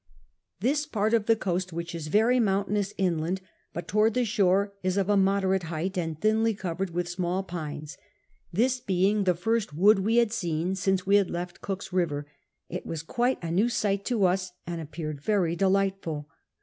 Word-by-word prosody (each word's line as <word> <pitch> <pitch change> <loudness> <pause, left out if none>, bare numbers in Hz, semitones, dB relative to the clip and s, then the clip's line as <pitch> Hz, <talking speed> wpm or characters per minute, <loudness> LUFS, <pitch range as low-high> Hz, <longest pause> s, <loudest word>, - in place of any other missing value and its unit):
This 290 +6 +1
part 220 -4 0
of 225 -3 +2
the 225 - +5
coast, 185 -3 -2
which 170 +1 -5
is 165 -2 -5
very 225 +9 +3
mountainous 200 -1 +1
inland, 175 -1 0 0.3
but 170 +1 -6
toward 215 +5 +2
the 250 -1 +2
shore 200 -2 +2
is 185 +1 0
of 195 0 +1
a 205 - +4
moderate 190 -1 +2
height 170 +4 -3
and 165 -4 -2
thinly 220 +2 +2
covered 190 -1 -3
with 175 +1 -2
small 180 +1 -1
pines; 155 -4 -6 0.5
this 250 +7 +2
being 195 0 +1
the 180 -1 +3
first 205 -2 -1
wood 200 +5 +5
we 215 +4 +1
had 235 -2 +3
seen 175 -4 -1
since 190 -1 0
we 200 +1 +5
had 200 -3 +2
left 175 0 -5
Cook's 195 -1 -5
River, 155 -6 0 0.4
it - - -5
was 165 -1 -5
quite 240 +9 0
a 165 - -3
new 205 +8 +3
sight 200 -4 0
to 230 -6 +2
us 185 0 0
and 170 -1 -4
appeared 155 -2 -6
very 180 -3 +1
delightful. 190 -5 0
190 Hz, 185 wpm, -27 LUFS, 170-210 Hz, 0.5 s, the